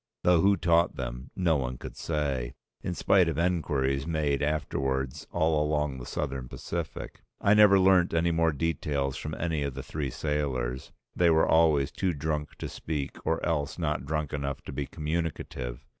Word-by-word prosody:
Though 90 -2 +5
who 100 +2 +4
taught 85 -1 +3
them 60 +2 -5
no 85 -4 +2
one 65 -2 -3
could - - -8
say, 70 -6 -2 0.3
in 90 - -3
spite 90 -2 +4
of 80 - -3
enquiries 75 -6 0
made 75 -4 0
afterwards 70 -3 -1
all 80 -1 +2
along 75 -3 -1
the - - -8
Southern 65 -3 -3
Pacific. - - -5 0.2
I 100 - +4
never 105 -2 +7
learnt 95 -2 +5
any 85 +1 +2
more 80 0 +3
details 70 -3 -1
from 75 - -5
any 80 -3 -1
of 70 -2 -2
the 70 - -5
three 75 -3 -3
sailors, 65 -3 -2 0.2
they 85 -1 +4
were 80 -1 +4
always 80 -3 +4
too 95 -2 -1
drunk 75 0 -3
to - - -5
speak 75 -4 -5
or 80 - +1
else 75 -4 -1
not 75 -5 -1
drunk 75 -1 -2
enough 70 -2 -3
to - - -7
be 70 0 -3
communicative. 75 -5 -4
75 Hz, 175 wpm, -28 LUFS, 70-80 Hz, 0.3 s, never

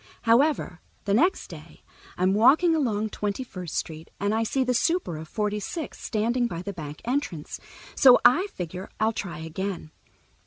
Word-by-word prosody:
However, 235 - +2 0.2
the 200 - +1
next 345 - +2
day - - -13 0.3
I'm 185 +1 +2
walking 285 - +5
along 220 -9 0
Twenty 205 +4 -3
first 180 -9 -8
Street 160 0 -4
and 205 +2 0
I 220 - +1
see 260 +4 0
the 250 0 0
super 330 - 0
of 155 +1 -8
Forty 210 +3 -2
six 310 - -6
standing 235 +3 0
by 170 -5 -6
the 200 - -5
back 150 -4 -8
entrance, 240 - -3 0.3
so 255 -2 +7
I 320 +12 +5
figure 185 - -7
I'll 220 +1 +2
try 175 -7 -5
again. 165 0 -5
210 Hz, 165 wpm, -26 LUFS, 180-255 Hz, 0.3 s, so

